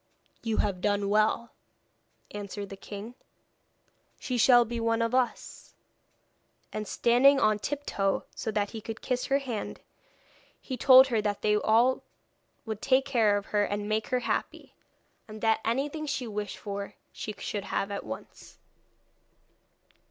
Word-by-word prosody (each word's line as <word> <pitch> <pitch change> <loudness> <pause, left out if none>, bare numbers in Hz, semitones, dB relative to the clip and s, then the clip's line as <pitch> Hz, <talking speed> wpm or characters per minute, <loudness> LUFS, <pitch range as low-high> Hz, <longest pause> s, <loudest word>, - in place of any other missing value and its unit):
'You 225 -2 -2
have 195 -3 0
done 205 0 +1
well,' 215 +2 +2 0.8
answered 205 -1 -6
the 195 - -7
king; 205 +4 -8 1.1
'she 255 - -3
shall 240 0 +6
be 235 +1 -4
one 230 0 +1
of 230 +1 0
us.' 255 -1 -2 1.0
And 215 -1 -4
standing 260 +6 +4
on 215 -3 +3
tiptoe, 210 -7 -1
so - - -4
that 205 -2 -1
he 225 - -7
could 225 +1 -7
kiss 250 -1 -1
her 275 - +3
hand, 250 -6 -5 0.8
he 260 - -5
told 260 +1 +7
her 225 -3 +1
that 205 -1 -2
they 210 0 +3
would 210 - 0
all 235 +4 +3 0.8
take 265 0 +3
care 220 -6 +3
of 200 - -5
her 205 -1 +3
and 205 0 -2
make 215 0 -1
her 250 -1 0
happy, - - -3 0.5
and 215 0 -9
that 225 -1 +3
anything 285 +7 -1
she 270 -3 -2
wished 210 -2 -5
for 200 -1 -6 0.2
she 215 - -6
should 205 -2 -4
have 195 0 -2
at 200 - -4
once. 110 0 -10
220 Hz, 150 wpm, -28 LUFS, 205-250 Hz, 1.1 s, told